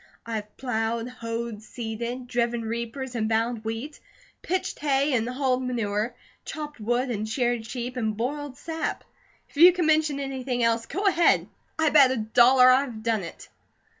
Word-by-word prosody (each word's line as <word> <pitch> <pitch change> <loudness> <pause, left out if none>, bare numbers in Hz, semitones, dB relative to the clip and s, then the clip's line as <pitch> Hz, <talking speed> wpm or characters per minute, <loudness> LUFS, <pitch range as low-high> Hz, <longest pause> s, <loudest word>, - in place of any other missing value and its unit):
I 230 - -5
have 210 0 -9
plowed, 230 -2 -2
hoed, 230 -2 -5
seeded, 235 +2 -5
driven 240 -1 -1
reapers 235 +3 -4
and 220 -2 -1
bound 225 0 0
wheat, 225 +7 -5 0.4
pitched 370 +1 -2
hay 280 0 +1
and 235 -1 +1
hauled 255 0 0
manure, 230 -2 -2 0.3
chopped 300 -3 -7
wood 240 +4 0
and 215 -1 -3
sheared 240 -1 0
sheep, 245 0 -5
and 220 -3 -1
boiled 280 +3 -3
sap; 325 +1 -4 0.4
if - - -18
you 345 +4 +9
can 355 -1 -1
mention 310 -2 +2
anything 260 -3 -2
else, 230 0 +1
go 395 +4 -3
ahead, 345 -3 +4 0.3
I 320 -1 +3
bet 280 -4 +7
a 260 - -1
dollar 245 +4 +5
I've 255 -4 +1
done 225 -2 +1
it." 170 - -9
245 Hz, 165 wpm, -26 LUFS, 225-275 Hz, 0.4 s, you